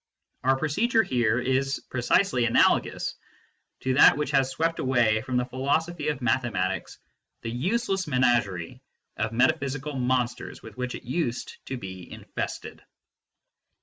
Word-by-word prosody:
Our 135 +1 +3
procedure 220 - +2
here 120 - +1
is 130 +2 0
precisely 125 +2 +2
analogous 115 - +2 0.7
to 130 - 0
that 130 - +7
which 150 -1 -2
has 135 -2 +3
swept 165 +5 -1
away 120 -4 +2
from 130 0 -2
the 125 - +1
philosophy 145 +5 -1
of 145 -4 -2
mathematics 100 -7 -1 0.5
the 115 - -3
useless 190 - -1
menagerie 120 - +1 0.4
of 110 +1 -1
metaphysical 140 +3 0
monsters 125 -2 -1
with 110 -2 -11
which 125 0 -3
it - - -9
used 125 -2 -3
to 135 - -3
be 95 -4 -9
in - - -10
fested. - - -4
130 Hz, 135 wpm, -26 LUFS, 120-145 Hz, 0.7 s, that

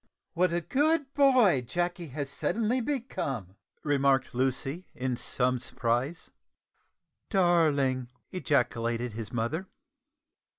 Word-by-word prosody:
"What 180 +1 +2
a 170 +1 0
good 290 - +1
boy 255 - +5
Jacky 175 +6 -2
has 145 0 -4
suddenly 230 - 0
become!" 140 - -3 0.3
remarked 140 -2 +2
Lucy 135 +6 -1
in 130 -1 -1
some 125 +1 0
surprise. 125 +6 -2 1.0
"Darling!" 150 - +2 0.2
ejaculated 120 - 0
his 110 -2 -6
mother. 130 +11 -2
145 Hz, 95 wpm, -29 LUFS, 125-185 Hz, 1.0 s, boy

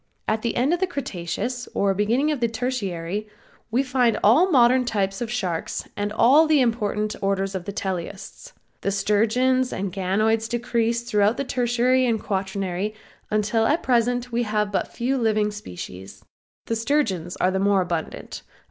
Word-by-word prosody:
At 220 0 0
the 235 - -2
end 260 +7 +2
of 350 - 0
the 375 - +1
Cretaceous 240 - -4
or 200 -1 +2
beginning 235 +10 +1
of 295 - -2
the 235 - +2
Tertiary 210 -5 -3 0.4
we 245 +4 +1
find 250 -4 +2
all 225 +8 +6
of 360 - +5
our - - -4
modern 255 -2 +5
types 195 -4 -1
of 235 - -2
sharks 185 -9 -3
and 205 0 -2
all 250 +7 +5
of 320 - +2
the 305 -2 +5
important 215 -3 0
orders 195 0 0
of 185 -2 -4
teleosts. 195 - -5 0.3
The - - 0
sturgeons 225 +6 +2
and 190 -1 -3
ganoids 215 +4 +1
decreased 235 -1 0
throughout 210 -1 +2
the - - -1
Tertiary 250 0 +2
or 230 -2 +2
Quaternary 195 0 -3 0.3
until 215 +1 +1
at 310 - +1
present 245 0 +1
we 235 +1 0
have 210 -2 0
but 200 - 0
few 260 +3 -1
living 215 -2 +1
species. 95 - -9 0.4
The 230 - -1
sturgeons 225 - 0
are 185 - +1
the 190 - -1
more 200 0 +3
abundant. 170 -2 -4
220 Hz, 170 wpm, -23 LUFS, 195-245 Hz, 0.4 s, all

